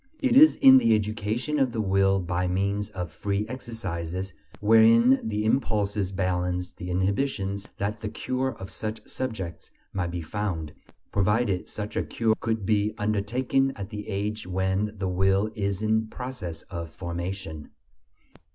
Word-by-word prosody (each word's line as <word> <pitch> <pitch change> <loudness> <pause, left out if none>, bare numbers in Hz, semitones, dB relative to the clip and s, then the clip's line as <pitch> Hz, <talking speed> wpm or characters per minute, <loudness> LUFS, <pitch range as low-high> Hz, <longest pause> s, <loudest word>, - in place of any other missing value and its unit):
It 260 -3 +2
is 310 +3 +8
in 265 -1 +8
the 115 - +4
education 110 +7 -1
of 130 -3 +2
the 115 - -2
will 95 -1 +3
by 90 0 -1
means 100 +3 0
of 90 -5 -5
free 100 +5 -2
exercises 95 -7 -5 0.3
wherein 115 +4 +6
the 105 -1 -2
impulses 105 -5 0
balance 90 -1 -1
the 90 - -7
inhibitions 100 +1 -1
that 105 +2 -2
the 110 - -3
cure 130 +3 -2
of 95 - -8
such 110 0 -5
subjects 110 -10 -5 0.2
might 90 -3 -1
be 85 -1 -4
found, 80 -4 -3 0.4
provided 100 -1 +1
such 105 0 -6
a - - +2
cure 115 -1 +1
could 110 -3 -1
be 105 +1 +1
undertaken 125 +6 +1
at 100 +1 -7
the 105 -1 -6
age 105 0 -3
when 95 +3 0
the 95 -1 -2
will 95 +3 +2
is 100 -1 -2
in 110 0 +2
process 110 -10 -6
of 85 -2 -6
formation. 85 -1 -5
100 Hz, 150 wpm, -26 LUFS, 95-110 Hz, 0.4 s, is